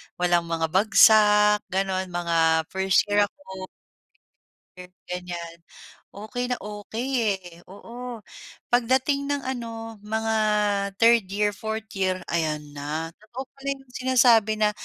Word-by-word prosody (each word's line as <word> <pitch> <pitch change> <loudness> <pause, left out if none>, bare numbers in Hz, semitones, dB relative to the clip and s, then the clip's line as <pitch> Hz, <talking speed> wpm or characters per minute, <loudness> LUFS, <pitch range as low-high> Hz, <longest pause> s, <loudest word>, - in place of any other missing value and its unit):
walang 175 -1 +1
mga 165 -1 -2
bagsak 210 +1 +5
gano'n, 190 0 -1
mga 165 -2 +1
1st 190 0 +2
year 205 0 +4
ako. 190 -8 -10 1.4
Ganyan, 175 -2 -6 0.6
okey 230 +5 -4
na 250 - -1
okey, 210 +4 -5 0.3
eh. 190 - -15 0.2
Oo, 235 +3 -9 0.5
pagdating 260 +4 +2
ng 285 -1 -2
ano 225 -3 -6
mga 220 +2 -2 0.6
3rd 230 -1 +4
year, 205 +2 0
4th 220 +2 -5
year, 185 -1 -1
ayan 155 -3 -1
na, 150 +3 -5
totoo 235 +5 -8
pala 275 0 -12
'yong 270 -2 -19
sinasabi 240 -4 +3
na 210 -1 +3
210 Hz, 115 wpm, -25 LUFS, 180-235 Hz, 1.4 s, bagsak